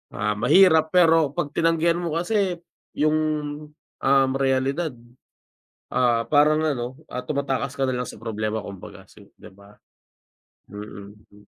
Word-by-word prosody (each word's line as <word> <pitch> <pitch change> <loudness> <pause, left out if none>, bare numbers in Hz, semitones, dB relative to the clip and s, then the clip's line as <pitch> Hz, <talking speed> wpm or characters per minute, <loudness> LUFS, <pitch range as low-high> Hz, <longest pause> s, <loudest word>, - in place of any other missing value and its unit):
Ah, 105 +1 -2
mahirap 160 -5 +5
pero 165 -4 +4
pag 145 - -2
tinanggihan 165 +1 +1
mo 170 -3 -3
kasi 185 +1 0 0.4
yung, 155 +1 +2 0.9
um, 135 0 +4
realidad, 135 +3 0 1.0
ah, 120 -2 +1
parang 150 +1 +4
ano, 130 -5 -2
ah, 125 - -5
tumatakas 140 -2 -2
ka 135 -1 0
na 130 - -1
lang 125 -1 -3
sa - - -10
problema 110 -1 -3
kumbaga 100 -2 -11
si, - - -17
'di 105 - -15
ba? 100 +1 -18 1.0
Mm. 105 0 -10 0.2
Hmm. 105 0 -19
135 Hz, 135 wpm, -23 LUFS, 110-160 Hz, 1.0 s, mahirap